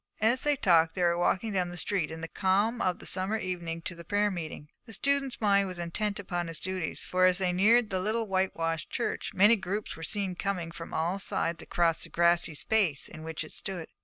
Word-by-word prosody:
As 235 +4 +4
they 295 0 +2
talked 165 -9 +3
they 180 - 0
were 170 0 +3
walking 190 +5 0
down 180 -2 0
the 175 - -7
street 185 -5 -1
in 160 0 -7
the 165 - -4
calm 205 +7 +1
of 180 -1 +1
the - - -11
summer 190 +3 +1
evening 170 -4 -4
to 185 - -3
the 170 0 -11
prayer 205 +3 +1
meeting. 160 -4 -6 0.2
The 225 - -10
student's 275 +3 0
mind 200 -2 +3
was 185 -1 -6
intent 195 +4 -2
upon 175 -3 -3
his 165 -1 -6
duties, 185 -3 -3
for, 185 0 +3
as 180 -1 +3
they 185 -2 +1
neared 220 +4 +4
the 190 - 0
little 220 +4 -1
white 190 -2 0
washed 165 -1 -2
church, - - -2
many 205 +5 +7
groups 200 +1 -4
were 165 - -11
seen 190 +3 -2
coming 180 -2 -3
from 165 0 -8
all 170 +5 -1
sides 170 -3 -2
across 170 -2 +1
the - - -6
grassy 170 -2 +3
space 180 -5 +1
in 155 - -11
which 160 0 -4
it 155 - -11
stood. 185 -5 -6
185 Hz, 225 wpm, -29 LUFS, 170-205 Hz, 0.2 s, many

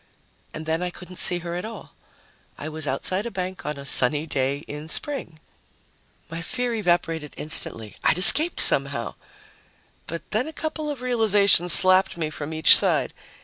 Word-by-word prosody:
And 155 - -8
then 160 +2 -1
I 180 - -2
couldn't 180 0 -12
see 175 - +5
her 170 - -5
at 175 - -5
all. 220 -2 -10 0.6
I 155 - -7
was 155 -1 -7
outside 185 - -2
a - - -4
bank 185 -5 -6
on 150 -1 -4
a 140 - -10
sunny 145 +3 +1
day 140 0 -3
in 150 +2 -9
spring. 170 - -6 0.9
My 165 +1 -7
fear 245 +6 -3
evaporated 170 -7 -2
instantly 115 -8 -1
I'd - - +2
escaped 310 - +7
somehow! 140 -4 +3 0.9
But 170 0 -6
then 220 +6 0
a 320 - -8
couple 310 -1 -5
of 275 -4 -6
realizations 205 -7 +3
slapped 185 -1 +3
me 155 -2 -3
from 150 0 -7
each 160 0 +5
side. - - 0
170 Hz, 165 wpm, -23 LUFS, 150-205 Hz, 0.9 s, escaped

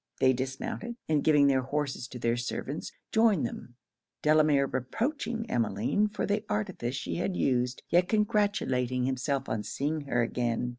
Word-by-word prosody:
They 130 0 +5
dismounted, 180 - -4
and 150 -2 +2
giving 150 -2 +5
their 135 -2 +4
horses 135 -1 -2
to 125 - -8
their 115 0 +1
servants, 125 +4 -4 0.2
joined 220 - +4
them; 120 +1 -7 0.5
Delamere 150 -2 +4
reproaching 225 - -2
Emmeline 115 - +1
for 210 -1 -3
the 205 +1 0
artifice 185 - -2
she - - -3
had 180 +1 -1
used, 125 -1 0
yet 175 +1 +3
congratulating 200 - +1
himself 135 +1 -1
on 110 - -1
seeing 150 +7 -2
her 120 -3 +2
again. 120 0 -1
140 Hz, 150 wpm, -29 LUFS, 125-205 Hz, 0.5 s, They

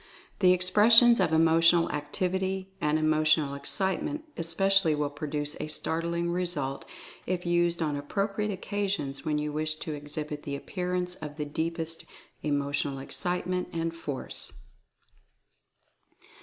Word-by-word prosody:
The 185 -3 +6
Expressions 215 +6 +6
of 180 -4 +2
Emotional 165 +1 +4
Activity 185 +6 -2
and 150 +1 +2
Emotional 155 -2 +2
Ex 140 0 -5
citement 195 - -1
especially 170 0 +3
will 145 -1 -1
produce 150 0 -2
a - - -3
startling 170 +2 -1
result 170 -7 -2 0.4
if 180 -1 -2
used 175 -1 +1
on 150 -2 -1
appropriate 200 +8 -2
occasions 195 -8 -3
when 150 -1 0
you 150 0 -2
wish 155 +1 -1
to 155 0 -6
ex 145 0 -7
hibit 150 -1 -4
the 140 -1 -4
appearance 180 +3 -3
of 150 -4 -8
the 150 - -2
deepest 165 +2 -3 0.4
Emotional 145 -1 -1
Excite 175 +7 -1
ment 180 0 -2
and 165 0 -2
Force. 145 -5 -2
165 Hz, 130 wpm, -28 LUFS, 150-180 Hz, 0.4 s, The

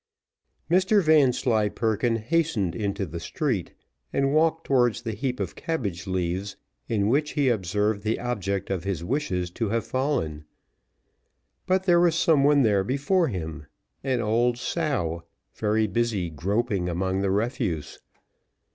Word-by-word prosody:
Mr 190 +5 +4
Vanslyperken 120 -6 +2
hastened 115 - 0
into 100 -2 -2
the 85 0 -6
street, 105 - -2 0.4
and 135 0 +1
walked 160 +1 +2
towards 120 -4 +2
the 115 - -3
heap 125 +4 -3
of - - -3
cabbage 105 - -3
leaves, 95 +2 -2 0.3
in 105 -3 +1
which 145 +6 +1
he 140 -3 +2
observed 105 0 0
the 110 +1 -1
object 100 -6 -2
of 95 -3 -2
his 95 -4 -3
wishes 90 - -2
to 110 +3 -2
have 115 0 -1
fallen; 130 - -1 1.2
but 190 0 +2
there 175 -2 +4
was 170 -2 +3
some 160 -4 +3
one 145 -1 +5
there 100 -4 +3
before 140 - +1
him, 80 - -5 0.4
an 130 -2 0
old 120 +2 +1
sow, 120 - -2 0.3
very 110 0 +1
busy 105 -4 -1
groping 95 +3 -1
among 95 +2 -1
the 100 - 0
refuse. 100 - -2
110 Hz, 140 wpm, -25 LUFS, 95-140 Hz, 1.2 s, one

